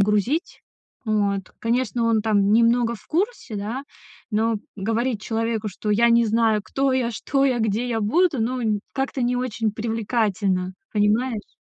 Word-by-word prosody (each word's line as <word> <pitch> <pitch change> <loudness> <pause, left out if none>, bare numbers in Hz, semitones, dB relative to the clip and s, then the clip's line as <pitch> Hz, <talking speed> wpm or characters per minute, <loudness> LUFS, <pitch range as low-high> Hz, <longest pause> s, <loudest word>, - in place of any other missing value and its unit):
грузить. 210 - +1 0.5
Вот. 205 -2 +1 0.2
Конечно, 235 0 0
он 230 -1 +3
там 205 -2 +2
немного 235 +1 +3
в 225 - -14
курсе, 370 - -2
да, 225 +7 -4 0.5
но 220 +1 +1 0.2
говорить 225 +2 -1
человеку, 225 -1 -1
что 210 +2 -6
я 230 +3 +4
не 235 0 +4
знаю 220 -1 +2
кто 270 +7 0
я, 255 -2 +1
что 275 +4 0
я, 255 -3 +1
где 220 +3 0
я 225 -2 -1
буду, 310 - +2
ну 225 -3 0
как-то 270 -1 -2
не 245 +1 +1
очень 230 -3 -1
привлекательно, 210 -4 -1 0.2
понимаешь? 215 +2 0
225 Hz, 150 wpm, -23 LUFS, 210-245 Hz, 0.5 s, я